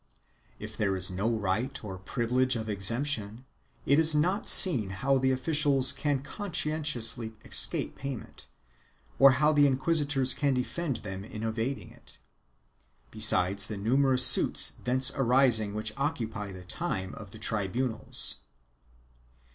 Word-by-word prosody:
If - - -9
there 100 -2 -1
is 90 0 -1
no 95 +5 -2
right 110 +4 -3
or 95 -3 -8
privi 115 +5 -5
lege 130 0 +2
of 110 -1 -5
exemption, 110 +3 0 0.4
it 140 +2 +3
is 160 -1 +1
not 180 +8 -1
seen 130 - +5
how 130 +8 -1
the 130 0 0
officials 135 0 +1
can 140 -1 -3
conscien 160 -3 -4
tiously 120 -5 -1
escape - - 0
payment, 135 -3 -8 0.7
or 135 0 +7
how 150 +4 +1
the 145 -1 +4
inquisitors 135 -1 +2
can 140 +1 -1
defend 135 +3 -3
them 95 -1 -7
in 105 +1 -9
evading 115 +4 -4
it, - - -13 0.9
besides 100 +3 +2
the 105 - -6
numerous 130 +4 +3
suits - - +5
thence 130 +1 0
arising 125 -5 +3
which 110 0 -1
occupy 115 -8 -4
the 95 -1 -11
time 95 - -5
of 105 -3 -11
the 110 - -13
tribunals. 110 +2 -1
125 Hz, 140 wpm, -27 LUFS, 105-140 Hz, 0.9 s, or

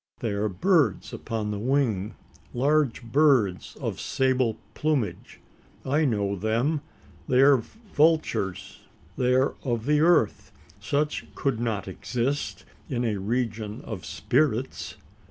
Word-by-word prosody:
They 115 - -2
are 100 +1 0
birds 145 - +1
upon 110 -2 -3
the 105 - -3
wing 115 -5 0 0.4
large 140 -1 +2
birds 115 - +2
of - - -3
sable 130 -4 +1 0.2
plumage. 150 -8 -2 0.5
I 150 +4 +2
know 100 -6 0
them. 115 - 0 0.5
They 125 - +3
are 140 0 +7
vultures. 155 - 0 0.4
They 125 +3 +2
are 130 +2 +2
of 120 -4 -2
the 150 +1 +3
earth. 160 -9 +3 0.3
Such 150 +1 -1
could 135 -6 -1
not 110 -5 -2
exist 125 +8 -3 0.2
in 125 -3 -1
a 105 -3 0
region 110 0 -2
of 105 -7 -6
spirits? 70 - -1
125 Hz, 120 wpm, -26 LUFS, 105-145 Hz, 0.5 s, are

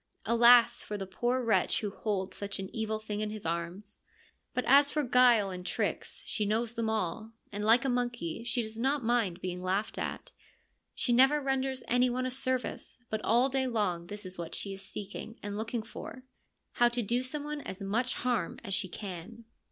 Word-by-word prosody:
Alas 235 0 +6
for 210 - -5
the 195 - -4
poor 240 +7 0
wretch 230 - +2
who 210 -2 -2
holds 195 -3 -2
such 200 0 -4
an 190 -1 -7
evil 220 -1 -1
thing 215 -1 -5
in 215 0 -1
his 215 -3 -7
arms! 170 +5 -4 0.5
But 250 - -2
as 280 +2 +6
for 300 0 0
guile 245 -5 +5
and 180 -1 -6
tricks, - - -2
she 220 - -2
knows 220 +3 0
them 230 -2 -1
all, 220 +1 -2 0.2
and 205 0 -4
like 230 +5 +5
a - - +2
monkey 240 -7 -1
she 240 0 0
does 220 +1 -5
not 270 +2 +1
mind 225 -7 +1
being 180 0 -4
laughed 190 +4 -1
at. - - -4 0.6
She 245 - +1
never 270 +5 +6
renders 270 -1 -1
anyone 250 +1 +2
a 255 - -1
service, 255 0 -2
but 215 0 -1
all 240 +4 +4
day 265 -1 0
long 195 -8 -1
this 205 +1 -7
is 185 -1 -3
what 170 - -5
she 195 - -3
is 195 - -8
seeking 205 +3 -6
and 205 0 -4
looking 225 +2 -3
for 255 +3 -9 0.2
— - - -50
how 240 0 +6
to 240 0 -1
do 240 +4 +1
some 285 +3 -4
one 295 0 -4
as 190 - -7
much 230 +6 0
harm 240 -8 -1
as 195 - -4
she 190 - 0
can. 200 +5 -8
225 Hz, 200 wpm, -31 LUFS, 200-245 Hz, 0.6 s, Alas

